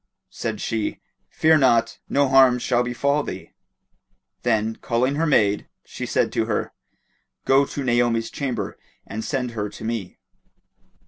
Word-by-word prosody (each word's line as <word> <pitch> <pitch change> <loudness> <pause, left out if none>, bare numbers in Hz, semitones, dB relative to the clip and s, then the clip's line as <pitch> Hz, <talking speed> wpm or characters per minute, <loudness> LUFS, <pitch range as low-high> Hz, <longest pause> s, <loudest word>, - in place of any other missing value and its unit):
Said - - -4
she, 110 -2 -2 0.3
"Fear 160 0 +4
not: 115 -4 +3
no 140 0 +3
harm 130 -2 +6
shall 120 0 +1
befall 130 +4 0
thee;" 95 -9 -7 0.9
then, 110 -2 0
calling 125 +3 0
her 160 +3 0
maid, 105 -8 +2 0.2
she - - -6
said - - +1
to - - +1
her, - - -2 0.7
"Go 135 +1 +4
to 140 - -5
Naomi's 120 -2 +1
chamber 120 -8 -4 0.3
and 110 +2 -5
send 125 -2 -2
her 105 -3 -3
to - - -11
me." 110 -5 -4
120 Hz, 140 wpm, -23 LUFS, 115-135 Hz, 0.9 s, harm